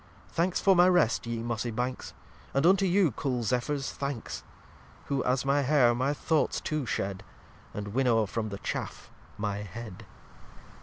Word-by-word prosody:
Thanks 175 +2 0
for 195 -1 +5
my 175 +1 +6
Rest 155 -11 +2
ye 115 -1 -3
Mossy 120 0 -2
Banks, 125 +3 -4 0.4
And 135 +3 +3
unto 195 +2 +5
you 180 -3 +3
cool 125 -5 -2
Zephyr's 130 +5 -1
Thanks, 140 -4 -5 0.6
Who, 140 -2 -1
as 130 +1 +1
my 140 +1 +3
Hair, 135 -3 +4
my 130 +4 0
Thoughts 155 +1 0
too 155 -5 -2
shed, 95 -3 -2 0.5
And 100 0 -5
winnow 115 -1 +2
from 110 +2 -3
the 100 - -5
Chaff - - -5 0.3
my 105 -1 -2
Head. 105 0 -8
125 Hz, 155 wpm, -29 LUFS, 115-150 Hz, 0.6 s, my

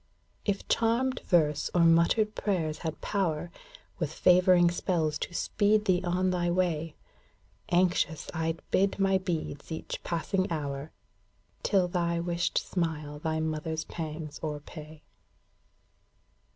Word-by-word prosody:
If 200 -2 -1
charmed 235 +3 +1
verse 155 -5 +2
or 175 - +5
muttered 170 +6 +4
prayers 165 -7 -1
had 160 -2 -5
power. 175 -4 -1 0.5
With - - -1
favouring 180 -1 +5
spells 165 -4 0
to 175 - -5
speed 210 +2 +2
thee 185 -3 +3
on 185 +1 +1
thy 175 -1 0
way. 170 -3 0 0.7
Anxious 175 -2 +1
I 160 0 0
'd 165 - -17
bid 195 +1 +2
my 195 -1 +3
beads 165 -5 -4
each 160 - -5
passing 185 +2 -1
hour, 145 -2 -3 0.7
Till 190 -3 +2
thy 170 -1 0
wished 170 0 -1
smile 155 -4 -2
thy 160 +1 -1
mother's 160 0 -2
pangs 155 -2 -6
o'erpay. 150 0 -7
170 Hz, 125 wpm, -29 LUFS, 160-185 Hz, 0.7 s, or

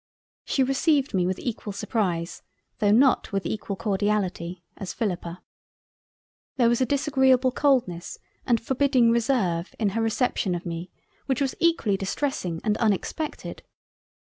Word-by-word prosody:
She 270 - +1
received 275 0 +1
me 180 -2 +2
with 185 0 -1
equal 225 -3 -4
surprise 180 -5 -2 0.4
though 205 - +3
not 250 +5 +4
with 195 -1 -2
equal 205 -2 -3
Cordiality, 190 -2 -1
as 190 -3 -6
Philippa. 180 -5 -3 1.1
There 240 -3 +4
was 240 +2 +1
a 255 - +2
disagreable 265 -2 +3
coldness 245 -12 0 0.3
and 235 -2 +2
Forbidding 255 -1 +2
Reserve 220 -8 0
in 215 -3 +1
her 225 +4 -2
reception 225 -4 0
of 175 - -6
me 170 +1 -5 0.4
which 265 -2 0
was 275 -2 0
equally 330 - +2
distressing 190 - -2
and 215 -1 +1
Unexpected. 230 - -2
220 Hz, 135 wpm, -25 LUFS, 185-260 Hz, 1.1 s, not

